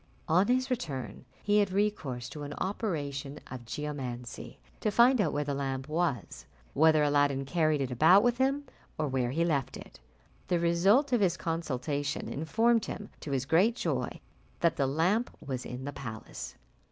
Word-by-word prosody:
On 180 +5 +4
his 255 +1 +1
return 150 - -4 0.2
he 210 0 +3
had 200 -2 +2
recourse 160 -12 -1
to 150 - -8
an 145 0 -5
operation 150 -8 -3
of 125 -2 -7
geomancy 125 -3 -5 0.2
to 215 - 0
find 235 +3 +5
out 165 -7 +1
where 145 +1 -1
the 145 0 -2
lamp 135 -1 -3
was 155 -5 -2 0.3
whether 155 0 +5
Aladdin 145 -2 +2
carried 155 -1 +1
it 130 -2 -2
about 160 - +6
with 245 0 +2
him, 275 +2 +2 0.3
or 155 - 0
where 130 -3 0
he 165 +6 +1
left 145 -6 -1
it. - - -13 0.5
The 175 - +2
result 195 - +3
of 240 - +3
his 180 -3 +2
consultation 145 -3 -2
informed 225 +9 +2
him, 210 - -6
to - - -7
his 135 -2 -1
great 185 - +3
joy, - - -2 0.4
that 170 -1 +3
the 135 - +1
lamp 180 - +1
was 130 -2 -5
in 125 +2 -6
the 145 - -4
palace. 110 -5 -7
155 Hz, 170 wpm, -30 LUFS, 135-200 Hz, 0.5 s, about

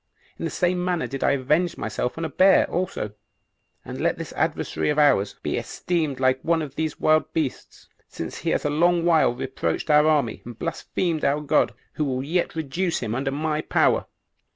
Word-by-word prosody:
In - - -3
the - - -1
same 180 0 0
manner 180 -2 0
did 135 0 -4
I - - +3
avenge 150 +6 +1
myself 110 +4 -3
on 165 - -2
a - - -3
bear 190 +1 +5
also; 175 - -2 0.7
and - - -6
let - - +1
this - - -7
adversary - - -1
of 150 - 0
ours 135 -10 +3
be - - -1
esteemed 160 -7 -2
like 130 0 +2
one 165 -1 +1
of 140 -3 -7
these 160 +1 -3
wild 155 0 +3
beasts, 155 -5 -4 0.2
since 80 - -6
he 165 - -2
has - - 0
a 145 - +1
long 170 +2 +2
while 160 -8 +4
reproached 135 +4 -2
our 150 +1 +6
army, 145 -8 +1
and 120 -2 -9
blasphemed 165 +1 -2
our 145 +2 +2
God, 145 - +2 0.2
who 135 -4 -1
yet 170 +5 -1
will 160 - -2
reduce 170 +5 -1
him 115 -3 -2
under 135 +3 -1
my 150 +2 -1
power." - - +2
150 Hz, 195 wpm, -24 LUFS, 135-165 Hz, 0.7 s, our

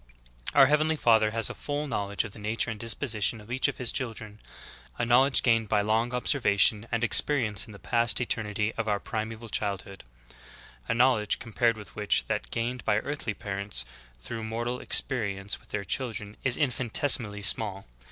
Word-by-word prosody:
9. 140 - +7
Our - - +9
Heavenly 155 +3 +2
Father 110 -6 +3
has 115 0 +1
a - - -2
full 145 +1 -4
knowledge 100 -6 -2
of 110 - -8
the 110 - -12
nature 110 +2 -1
and 110 - -7
dispositions 115 -1 -1
of 105 +2 -13
each 130 +1 +1
of - - -4
His 125 -2 0
children, 110 -4 -5 0.6
a - - 0
knowledge 130 +3 +4
gained 115 -3 +2
by 105 -1 +2
long 110 +3 0
observation 110 -4 +2
and 115 0 -1
experience 120 -3 +3
in - - -12
the 100 - -11
past 115 +1 0
eter 120 -2 -1
nity 105 +1 -2
of 110 - -2
our 105 -1 0
primeval 110 +2 -5
childhood; 100 -2 -4 0.8
a - - 0
knowledge 120 -4 +2
compared 115 0 0
with 105 - -12
which 105 -1 +2
that - - -3
gained 120 - -3
by 105 - +2
earthly 130 -3 -4
parents 100 - -4 0.3
through 60 - -7
mortal 120 +3 -3
ex - - +6
perience 100 -6 -3
with - - -24
their 105 -1 -3
children 105 -1 -4
is 130 -2 +2
infinitesimally 125 -5 +1
small. 100 -1 +3
115 Hz, 180 wpm, -27 LUFS, 105-125 Hz, 0.8 s, Our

